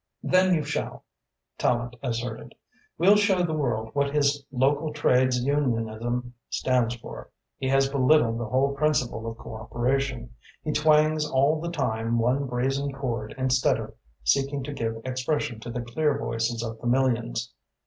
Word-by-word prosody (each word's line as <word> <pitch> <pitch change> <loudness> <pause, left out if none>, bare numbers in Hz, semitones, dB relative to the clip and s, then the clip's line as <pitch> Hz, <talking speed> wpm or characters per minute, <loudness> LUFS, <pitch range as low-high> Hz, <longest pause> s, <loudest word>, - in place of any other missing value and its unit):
"Then 185 0 +4
you 155 - 0
shall," 150 +1 -4 0.6
Tallente 120 0 0
asserted. 120 -2 -4 0.4
"We'll 195 +5 +6
show 195 -3 +3
the 165 -2 -1
world 110 -7 -1
what 140 0 0
his 145 -1 +2
local 140 +4 +1
trades 125 -4 +2
unionism 120 -3 -1 0.2
stands 125 -2 +1
for. 115 - -10 0.3
He 130 - -2
has 135 0 +4
belittled 130 -3 +3
the 120 - -3
whole 135 +4 +1
principle 135 -6 0
of 115 - -8
cooperation. 120 +2 -2 0.3
He 155 - -1
twangs 155 0 +3
all 145 +4 +2
the 170 - -3
time 115 -7 -1
one 125 +4 +1
brazen 135 +3 -1
chord 120 -5 -4
instead 130 0 +2
of - - -7 0.3
seeking 135 - +1
to 145 +2 -5
give 115 -4 -2
expression 130 -2 -2
to 115 - -8
the 120 +1 -3
clear 145 +4 0
voices 115 -3 -2
of 115 -1 -6
the 120 - -3
millions. 120 -2 0
130 Hz, 150 wpm, -26 LUFS, 120-145 Hz, 0.6 s, We'll